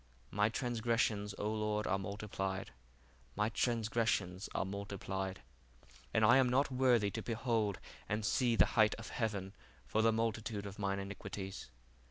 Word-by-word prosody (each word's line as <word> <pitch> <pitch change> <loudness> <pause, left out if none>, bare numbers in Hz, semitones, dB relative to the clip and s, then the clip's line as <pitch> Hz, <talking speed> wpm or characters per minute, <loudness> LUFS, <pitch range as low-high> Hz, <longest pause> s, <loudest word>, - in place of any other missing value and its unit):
My 105 +1 +3
transgressions, 115 -4 0
O 105 - -2
Lord, 105 0 0
are 95 - +1
multiplied: 95 -1 -3 0.6
my 105 +1 +1
transgressions 110 -5 0
are - - +1
multiplied, 95 -1 -4 0.7
and 110 - +4
I 120 +4 +7
am 130 -2 +4
not 135 +3 +2
worthy 125 -5 +3
to - - -3
behold 115 -4 0 0.3
and 105 0 -1
see 120 +2 +2
the - - +6
height 110 -3 +5
of 110 -2 -8
heaven 100 -4 -2 0.3
for 110 - +1
the 115 0 +5
multitude 110 -2 -1
of 100 0 -8
mine 100 -1 0
iniquities. 100 -2 -6
105 Hz, 145 wpm, -35 LUFS, 100-115 Hz, 0.7 s, I